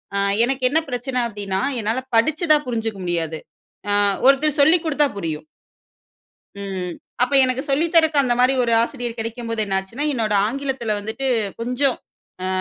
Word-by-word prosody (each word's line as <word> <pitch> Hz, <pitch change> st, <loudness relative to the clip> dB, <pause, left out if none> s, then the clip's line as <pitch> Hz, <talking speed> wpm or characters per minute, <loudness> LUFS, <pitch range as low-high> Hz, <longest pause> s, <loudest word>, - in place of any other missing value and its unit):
அ -, -, +1 dB, 0.3 s
எனக்கு 265 Hz, +1 st, -3 dB
என்ன 315 Hz, +4 st, +3 dB
பிரச்சனை 250 Hz, +1 st, -2 dB
அப்டீன்னா 200 Hz, -3 st, -3 dB, 0.2 s
என்னால 225 Hz, +5 st, -1 dB, 0.2 s
படிச்சு 315 Hz, +8 st, +1 dB
தான் 300 Hz, 0 st, +1 dB
புரிஞ்சுக்க 225 Hz, -4 st, -3 dB
முடியாது. 165 Hz, -2 st, -2 dB, 0.9 s
ஒருத்தர் 290 Hz, +2 st, +3 dB
சொல்லிக் 320 Hz, +4 st, +4 dB
குடுத்தா 295 Hz, -1 st, +2 dB
புரியும். 160 Hz, -4 st, -4 dB, 1.1 s
ம். 190 Hz, -3 st, -5 dB, 0.3 s
அப்போ 255 Hz, +3 st, +1 dB
எனக்கு 255 Hz, +1 st, -1 dB
சொல்லித்தரக்கு 320 Hz, +1 st, +3 dB
அந்த 245 Hz, -2 st, +1 dB
மாரி 255 Hz, +1 st, +4 dB
ஒரு 235 Hz, -, 0 dB
ஆசிரியர் 240 Hz, 0 st, -4 dB
கெடைக்கும்போது 230 Hz, 0 st, -3 dB
என்னாச்சுன்னா, 195 Hz, +8 st, -3 dB
என்னோட 220 Hz, -4 st, -1 dB
ஆங்கிலத்துல 260 Hz, -3 st, -2 dB
வந்துட்டு 220 Hz, +6 st, -4 dB, 0.3 s
கொஞ்சம், 250 Hz, +2 st, +1 dB, 0.5 s
அ -, -, -1 dB
245 Hz, 140 wpm, -21 LUFS, 210-275 Hz, 1.1 s, சொல்லிக்